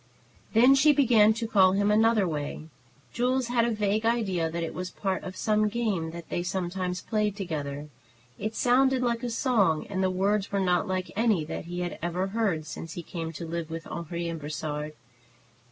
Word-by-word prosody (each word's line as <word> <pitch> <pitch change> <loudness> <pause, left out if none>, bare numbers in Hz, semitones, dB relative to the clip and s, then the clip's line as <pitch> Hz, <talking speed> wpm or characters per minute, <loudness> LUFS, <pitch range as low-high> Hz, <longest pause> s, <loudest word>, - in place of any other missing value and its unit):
Then 245 +4 +7
she 290 +2 +5
began 230 -6 +5
to 230 0 -3
call 190 -4 +5
him 205 +1 +2
another 220 -2 +4
way. 150 -2 -4 0.5
Jules 250 0 0
had 240 -1 +2
a - - +1
vague 210 -1 0
idea 200 -8 +1
that 170 +1 -3
it 165 - -4
was 180 0 -4
a - - -21
part 190 -2 -2
of 185 - -7
some 215 -1 +2
game 205 -8 -1
that 170 0 -9
they - - -1
sometimes 180 0 -3
played 210 -2 0
together. 150 -7 -4 0.5
It 215 +1 -3
sounded 260 +2 +3
like 235 -1 0
a 245 - -2
song, 220 - +2
and 190 -2 -3
the 190 - +2
words 195 +2 0
were 200 - 0
not 180 -3 +1
like 185 -1 -2
any 215 -7 +2
that 155 - -5
he 175 +1 -4
had 175 -1 -4
ever 175 +2 -1
heard 195 -8 0
since 165 +1 -7
he 175 - -6
came 165 -1 -5
to 170 - -6
live 165 0 -4
with 165 0 -6
Henri 170 0 -4
and 165 -1 -4
Brossard. 150 0 -4
190 Hz, 200 wpm, -27 LUFS, 170-225 Hz, 0.5 s, Then